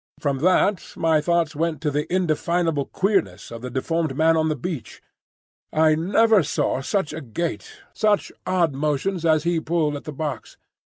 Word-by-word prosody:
From 140 Hz, -3 st, -1 dB
that 185 Hz, +4 st, +2 dB
my 160 Hz, -2 st, +2 dB
thoughts 170 Hz, -1 st, +1 dB
went 165 Hz, +1 st, -1 dB
to 150 Hz, -, 0 dB
the 150 Hz, +3 st, -2 dB
indefinable 170 Hz, -3 st, 0 dB
queerness 145 Hz, -, -1 dB
of 115 Hz, -1 st, -7 dB
the 125 Hz, -, -5 dB
deformed 150 Hz, +3 st, -2 dB
man 160 Hz, +1 st, +4 dB
on 160 Hz, 0 st, +1 dB
the 155 Hz, -, 0 dB
beach. 150 Hz, -1 st, -6 dB, 0.7 s
I 155 Hz, 0 st, +4 dB
never 205 Hz, +6 st, +3 dB
saw 135 Hz, -3 st, -1 dB
such 190 Hz, +3 st, -1 dB
a 160 Hz, -, -5 dB
gait, 160 Hz, +7 st, -5 dB
such 210 Hz, -1 st, +1 dB, 0.2 s
odd 170 Hz, -5 st, +2 dB
motions 155 Hz, +5 st, -1 dB
as 155 Hz, -2 st, +3 dB
he 170 Hz, -1 st, +1 dB
pulled 160 Hz, -2 st, 0 dB
at 145 Hz, -, -8 dB
the 155 Hz, -, -5 dB
box. 145 Hz, -5 st, -5 dB
160 Hz, 170 wpm, -23 LUFS, 145-175 Hz, 0.7 s, man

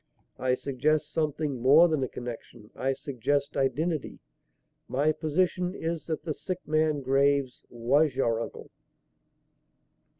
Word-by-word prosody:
"I 130 Hz, -1 st, +2 dB
suggest 140 Hz, +4 st, 0 dB
something 150 Hz, -4 st, -1 dB
more 145 Hz, +7 st, +7 dB
than 155 Hz, -4 st, 0 dB
a 130 Hz, -, 0 dB
connection. 120 Hz, -3 st, -9 dB
I 135 Hz, +1 st, 0 dB
suggest 140 Hz, +1 st, -2 dB
identity. 150 Hz, +3 st, -1 dB, 0.7 s
My 140 Hz, +5 st, +2 dB
position 180 Hz, +4 st, 0 dB
is 165 Hz, -2 st, -4 dB
that 160 Hz, -2 st, -3 dB
the 160 Hz, -, -2 dB
sick 185 Hz, +3 st, -6 dB
man, 155 Hz, -1 st, +1 dB
Graves, 135 Hz, 0 st, +1 dB
was 130 Hz, +5 st, +2 dB
your 115 Hz, -4 st, +1 dB
uncle." -, -, -8 dB
140 Hz, 125 wpm, -28 LUFS, 130-155 Hz, 0.7 s, more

